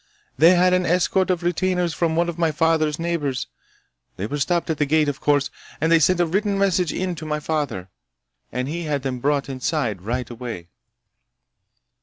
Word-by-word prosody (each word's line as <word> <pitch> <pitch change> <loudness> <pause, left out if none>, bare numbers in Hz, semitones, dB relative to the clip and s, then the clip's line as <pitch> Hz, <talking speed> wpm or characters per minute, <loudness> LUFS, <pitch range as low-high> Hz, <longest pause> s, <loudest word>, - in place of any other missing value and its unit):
They 170 +4 +6
had 180 +1 +4
an 180 0 +3
escort 180 +2 +1
of 180 -2 0
retainers 180 0 0
from 165 0 0
one 170 +1 +2
of 170 0 -5
my 165 -2 +2
father's 155 -1 +1
neighbors. 165 -6 -2 0.7
They 95 - -3
were 145 +7 -3
stopped 170 +3 0
at 155 - -3
the 145 - +1
gate, 155 +1 +3
of 145 0 -3
course, 145 -1 +2 0.3
and 160 +2 +1
they 165 - +6
sent 175 +4 +3
a 175 - +4
written 200 +4 0
message 190 -3 +2
in 185 -1 -2
to 160 -2 -8
my 150 0 -1
father, 145 - -3 0.6
and 125 +1 -2
he 165 +3 -4
had 145 -3 -2
them 130 -2 -3
brought 140 +2 0
inside 130 - -2
right 120 +4 -3
away!" 115 -8 -7
155 Hz, 190 wpm, -22 LUFS, 140-175 Hz, 0.7 s, They